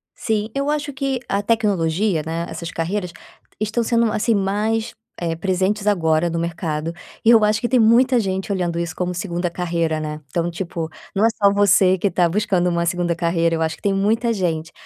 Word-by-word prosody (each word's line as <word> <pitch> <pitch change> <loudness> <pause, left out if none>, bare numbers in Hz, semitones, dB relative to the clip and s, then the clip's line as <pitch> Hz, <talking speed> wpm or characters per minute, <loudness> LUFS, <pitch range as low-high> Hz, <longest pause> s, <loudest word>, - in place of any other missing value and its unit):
Sim, 220 -1 -1
eu 280 +1 0
acho 295 -1 -2
que 270 -2 -2
a 200 - 0
tecnologia, 200 -5 +1
né, 165 +1 -3
essas 170 -1 -6
carreiras 180 +2 -3 0.5
estão 215 +2 0
sendo, 230 -1 +2
assim, 220 +1 +1
mais, 210 +3 -1 0.3
eh, 165 -1 -2
presentes 190 +4 -1
agora 165 -4 +2
no 165 0 -2
mercado, 165 -1 -3 0.3
e 225 - +4
eu 225 -2 +7
acho 210 +1 +2
que 240 - -1
tem 255 - +3
muita 240 +3 +5
gente 190 -1 -2
olhando 175 -3 -1
isso 170 -2 -3
como 180 0 -2
2ª 175 -1 -2
carreira, 170 -2 -1
né. 155 0 -5
Então, 170 +5 -1
tipo, 170 -2 -4 0.3
não 205 +3 +3
é - - +5
só 200 -1 +6
você 195 -2 +4
que 200 - 0
está 180 -2 +2
buscando 180 -1 +1
uma 170 0 0
2ª 175 -1 0
carreira, 170 -1 +1
eu 160 - -3
acho 160 0 0
que - - -25
tem 200 -1 +1
muita 225 +4 +1
gente. 165 -4 -2
185 Hz, 200 wpm, -21 LUFS, 170-215 Hz, 0.5 s, eu